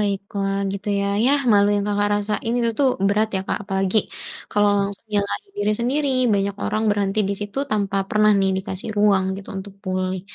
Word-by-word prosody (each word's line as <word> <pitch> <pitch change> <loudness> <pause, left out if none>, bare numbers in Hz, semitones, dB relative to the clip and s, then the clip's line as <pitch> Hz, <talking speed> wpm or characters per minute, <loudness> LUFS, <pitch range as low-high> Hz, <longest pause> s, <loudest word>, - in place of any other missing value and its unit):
baiklah. 200 -1 -2 0.2
Gitu 200 +1 -5
ya, 200 - 0 0.2
yah 280 +2 +3
malu 205 0 +5
yang 200 - 0
Kakak 205 0 +1
rasain 210 +3 -2
itu 235 -1 +1
tuh 275 -2 +4 0.2
berat 215 +2 +2
ya, - - -1
Kak, - - 0
apalagi 195 +1 0 0.5
kalau 205 0 +3
langsung 200 +2 -4
nyalahin 205 - -1
diri 205 +1 +1
sendiri. 280 +4 0 0.3
Banyak 200 0 0
orang 215 +1 -1
berhenti 205 0 0
di 200 - 0
situ 205 +6 -5
tanpa 200 -2 0
pernah 215 0 +4
nih 195 - +2
dikasih 190 +1 -5
ruang 200 -2 +4
gitu 195 - -10
untuk 190 +1 -7
pulih. 185 0 -2
205 Hz, 185 wpm, -22 LUFS, 195-215 Hz, 0.5 s, malu